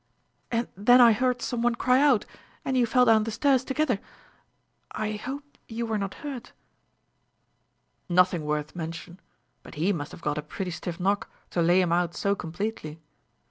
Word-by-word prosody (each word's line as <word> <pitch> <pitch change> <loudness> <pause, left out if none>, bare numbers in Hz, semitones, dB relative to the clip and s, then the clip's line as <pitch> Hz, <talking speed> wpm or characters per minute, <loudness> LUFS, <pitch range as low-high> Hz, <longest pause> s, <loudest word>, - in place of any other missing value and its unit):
And 235 0 -1
then 245 +6 +5
I 240 -2 +8
heard 250 +2 0
some 240 -2 -2
one 240 0 +2
cry 255 +2 +3
out, 280 -7 +4 0.4
and 265 - -1
you 245 -2 +3
fell 250 +2 +4
down 220 -2 +5
the 225 - -3
stairs 265 +3 +2
together. 265 -5 0 0.9
I 215 -1 -3
hope 260 +7 -5 0.2
you 230 +1 -4
were 220 -2 -1
not 195 -1 -4
hurt 255 -4 -7 0.8
?" - - -46
"Nothing 180 -2 +3
worth 150 +1 -3
mention; 170 +2 -7 0.4
but - - -13
he 175 +7 +1
must 145 -4 -5
have 170 - -12
got 150 0 -1
a - - -3
pretty 180 +5 -5
stiff 170 0 -6
knock, 200 +3 0 0.2
to 175 - 0
lay 175 +3 +4
him 175 -2 0
out 175 -1 0
so 200 - +1
completely." 175 -3 -5
210 Hz, 180 wpm, -26 LUFS, 175-245 Hz, 0.9 s, I